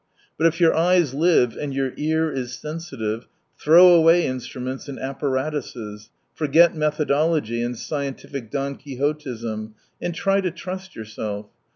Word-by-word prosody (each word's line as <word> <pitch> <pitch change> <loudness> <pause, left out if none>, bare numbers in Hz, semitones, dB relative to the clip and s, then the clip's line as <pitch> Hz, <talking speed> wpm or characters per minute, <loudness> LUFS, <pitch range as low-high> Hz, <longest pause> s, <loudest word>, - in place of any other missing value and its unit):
But 165 - +3
if 165 +1 -1
your 165 -2 +5
eyes 170 -4 +3
live 150 -5 +3
and 140 -2 -4
your 135 -1 -1
ear 160 +1 0
is 125 -3 -4
Sensitive 135 -9 -5 0.4
^throw 175 +3 +8
away 165 +1 +5
instruments 130 +1 -5
and 135 - -6
apparatuses, 130 -6 -4 0.2
forget 160 +3 +4
methodology 150 -4 +1
and 120 0 -3
scientific 140 -4 -5
Don 140 0 -3
Quixotism, 125 -6 -4 0.3
and 175 - -3
try 195 +2 +2
to 185 - 0
trust 185 +2 -7
yourself. 105 -1 -6
145 Hz, 135 wpm, -23 LUFS, 125-165 Hz, 0.4 s, ^throw